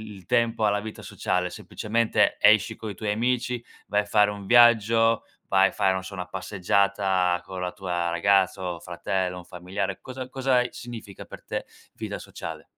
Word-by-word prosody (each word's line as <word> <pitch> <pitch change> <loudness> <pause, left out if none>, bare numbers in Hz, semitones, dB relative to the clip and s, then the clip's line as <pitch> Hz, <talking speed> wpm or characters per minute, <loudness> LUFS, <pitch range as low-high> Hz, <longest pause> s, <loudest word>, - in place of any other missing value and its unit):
il 95 -3 -14
tempo 115 -2 +1
alla 105 0 +2
vita 110 0 -8
sociale? 90 0 -1
Semplicemente 115 +1 0
esci - - +5
coi 105 -3 -7
tuoi 105 -2 -2
amici, 120 +1 -1 0.2
vai 105 0 +2
a - - -9
fare 105 0 +3
un 100 -1 -8
viaggio, 115 -1 +5 0.2
vai 95 0 +5
a - - -11
fare, 95 -1 +2
non 95 0 -3
so, 100 +1 -8
una 90 -1 -4
passeggiata 95 -1 +1
con 95 -1 -6
la 90 0 -2
tua 90 -3 -2
ragazza 95 +2 +2
o 85 - -9
fratello, 90 +1 -2
un 90 - -10
familiare. 95 +2 -4
Cosa 130 0 -7
cosa 130 -1 +1
a 125 0 +2
significa 115 -5 -9
per - - -11
te - - -4 0.3
vita - - -5
sociale? - - -8
100 Hz, 180 wpm, -25 LUFS, 95-115 Hz, 0.3 s, esci